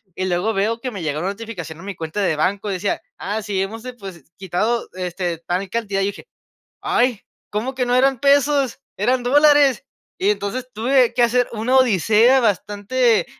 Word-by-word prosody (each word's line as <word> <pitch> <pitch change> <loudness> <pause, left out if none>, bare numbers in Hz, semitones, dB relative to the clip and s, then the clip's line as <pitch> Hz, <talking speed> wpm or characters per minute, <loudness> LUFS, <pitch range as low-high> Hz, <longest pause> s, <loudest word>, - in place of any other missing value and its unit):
y 185 - -2
luego 185 +4 0
veo 220 +4 0
que 255 - -4
me 200 -5 -7
llegó 150 -1 -2
una 185 +4 -2
notificación 195 -7 -7
a - - -11
mi 200 0 -6
cuenta 160 +5 -4
de 185 -5 +1
banco, 200 +6 -1
decía: 195 +1 -2 0.2
"Ah, 210 +3 -3
sí, 200 -2 -3
hemos, 220 +4 -4
depos 200 -9 -9 0.2
quitado, 210 +5 -1
este, 180 -2 -3
tal 180 +3 -3
cantidad", 205 -4 -1
y - - +1
dije: - - -13 0.5
"Ay, 245 -3 +1 0.3
¿cómo 230 +6 -2
que 255 -1 0
no 245 - +2
eran 265 0 +3
pesos?, 280 -1 +2 0.2
eran 245 +5 +1
dólares". 290 0 +4 0.4
Y 390 +3 +2
entonces, 255 - -2
tuve 245 +2 +2
que 240 - +3
hacer 245 +1 +2
una 230 +4 +1
odisea 235 +2 +4
bastante, 215 +3 +1
220 Hz, 180 wpm, -20 LUFS, 195-250 Hz, 0.5 s, dólares